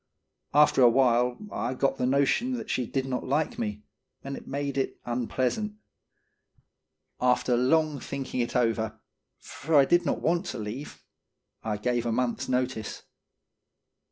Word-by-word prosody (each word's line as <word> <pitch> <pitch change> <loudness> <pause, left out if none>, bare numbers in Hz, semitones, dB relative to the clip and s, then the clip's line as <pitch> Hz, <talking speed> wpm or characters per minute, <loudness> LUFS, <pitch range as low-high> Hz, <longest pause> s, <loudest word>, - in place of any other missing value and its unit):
After 150 -2 +5
a 120 - +8
while, 125 0 +3
I 125 +2 -2
got 135 +1 0
the 125 - +1
notion 140 - +2
that 245 - -4
she 125 -3 -1
did 135 +2 -1
not 130 -1 -2
like 145 +4 -1
me, 105 -2 -3 0.4
and 140 0 -5
it - - -11
made 140 0 -3
it 135 - -2
unpleasant. 125 - -1 1.5
After 125 0 +3
long 150 +4 +2
thinking 135 -1 -5
it 120 - -1
over, 110 -2 0 0.4
for 160 +2 -3
I 140 -2 +7
did 175 +4 +3
not - - -1
want 175 +3 0
to 130 - -4
leave, 110 +7 -7 0.6
I 110 -2 -2
gave 120 +2 -1
a - - 0
month's 120 +1 -1
notice. 125 -4 -2
130 Hz, 150 wpm, -27 LUFS, 120-140 Hz, 1.5 s, a